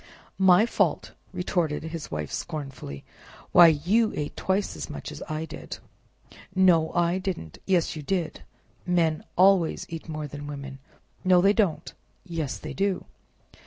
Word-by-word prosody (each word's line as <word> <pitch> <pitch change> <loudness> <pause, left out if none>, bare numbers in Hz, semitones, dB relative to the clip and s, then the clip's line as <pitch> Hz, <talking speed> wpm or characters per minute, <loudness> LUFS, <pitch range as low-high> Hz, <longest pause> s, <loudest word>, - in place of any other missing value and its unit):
"My 190 +2 +6
fault!" - - 0 0.2
retorted 175 -5 -1
his 160 -1 -6
Wife 75 -1 -4
scornfully, 135 - -6 0.5
"why, 175 -1 +9
you 180 +9 +3
ate 145 -1 -4
twice 190 +2 -1
as - - -6
much - - -6
as - - -9
I 155 +1 -2
did!" 155 - -8 0.8
"No, 175 -4 +4
I 175 +1 +2
didn't!" 180 - -5
"Yes, 175 -3 +2
you 155 - -5
did! 170 +1 -2 0.5
Men 165 -3 +1
always 185 -2 +4
eat 165 0 -7
more 155 -1 -4
than 145 0 -7
women. 140 -2 -7 0.4
"No, 185 -1 +5
they 195 +3 +5
don't!" 200 -7 0 0.3
"Yes, 165 -6 -3
they 155 -2 -7
do!" 195 +3 -1
165 Hz, 145 wpm, -26 LUFS, 150-185 Hz, 0.8 s, why